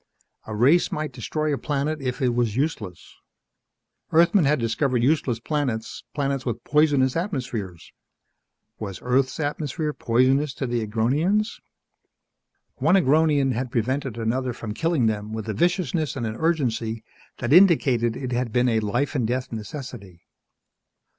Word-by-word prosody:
A 110 - -5
race 140 +11 +4
might 155 -1 -3
destroy 150 +5 -2
a 140 - -2
planet 150 +1 -2
if 130 0 -3
it 125 - +3
was 120 -3 0
useless. 115 - -3 0.9
Earthmen 170 +2 +4
had 150 +2 +3
discovered 120 +1 0
useless 130 -4 +1
planets, 125 -5 -3
planets 140 -2 -1
with 120 -2 -4
poisonous 145 -4 +3
atmospheres. 125 - -4 0.9
Was 100 -4 -5
Earth's 130 +2 +1
atmosphere 150 +1 -2
poisonous 130 +4 +2
to 135 - -3
the 120 -1 -1
Agronians? 150 - 0 1.2
One 155 +7 +3
Agronian 150 -4 +3
had 125 +1 -2
prevented 130 +1 -2
another 125 +3 -1
from 110 -2 -6
killing 165 -1 +1
them 105 -1 -1
with 110 -1 -5
a 110 - -2
viciousness 175 - 0
and 125 -4 -3
an 110 0 -3
urgency 115 -8 -1 0.3
that 120 +4 0
indicated 135 - +4
it 130 -2 -5
had 120 -1 -1
been 125 +2 +2
a 110 -1 +2
life 120 +8 -1
and 125 -7 0
death 125 +2 -2
necessity. 110 - -8
130 Hz, 140 wpm, -24 LUFS, 115-150 Hz, 1.2 s, race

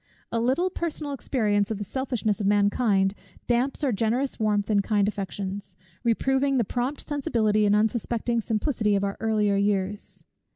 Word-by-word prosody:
A 230 - 0
little 270 +11 +1
personal 315 -4 -3
experience 210 -7 0
of 220 - -2
the 205 - -4
selfishness 230 -2 -2
of 200 - 0
mankind, 205 -1 +3 0.3
damps 250 +5 0
our 275 - +2
generous 235 +6 0
warmth 210 -2 +1
and 200 -1 +3
kind 205 -2 +2
affections; 195 -1 -4 0.3
reproving 265 +3 +2
the 240 - +3
prompt 245 +7 -2
sensibility 220 -8 +1
and 205 - +4
unsuspecting 230 +2 0
simplicity 220 -1 0
of 200 - 0
our 200 0 -1
earlier 210 -2 +2
years. 200 0 -1
220 Hz, 155 wpm, -26 LUFS, 205-250 Hz, 0.3 s, and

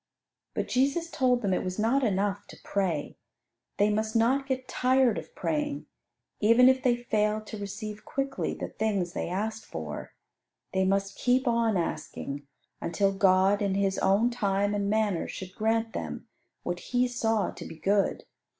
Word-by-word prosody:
But - - -1
Jesus 280 +6 +1
told 250 -2 +2
them 195 -2 +1
it - - 0
was 185 0 -3
not 235 +6 +2
enough 200 -2 0
to - - -12
pray: 180 -7 -1 0.6
they 205 +1 +3
must 215 +2 -1
not 260 +5 +3
get 260 -1 -2
tired 255 -2 +3
of - - -13
praying, 295 -2 -2 0.5
even 230 +4 +6
if 260 0 +4
they 250 -2 +3
failed 215 -2 0
to 215 -1 -7
receive 210 +1 -6
quickly 275 0 -2
the - - -5
things 195 -6 -1
they - - -3
asked 215 +4 -2
for. 80 -2 -7 0.6
They 190 0 +2
must 195 +1 0
keep 255 +1 +2
on 230 -3 +2
asking, 145 -4 -4 0.3
until 195 +4 +1
God 195 +1 +4
in 200 -2 +1
His 195 -1 +1
own 205 +5 +3
time 205 -3 0
and 200 -1 0
manner 210 -5 +1
should 185 -1 -7
grant 225 +1 0
them - - -5 0.4
what 175 0 -2
He 250 0 +2
saw 225 -5 0
to - - -9
be - - -8
good. 195 +4 +1
215 Hz, 165 wpm, -28 LUFS, 195-245 Hz, 0.6 s, even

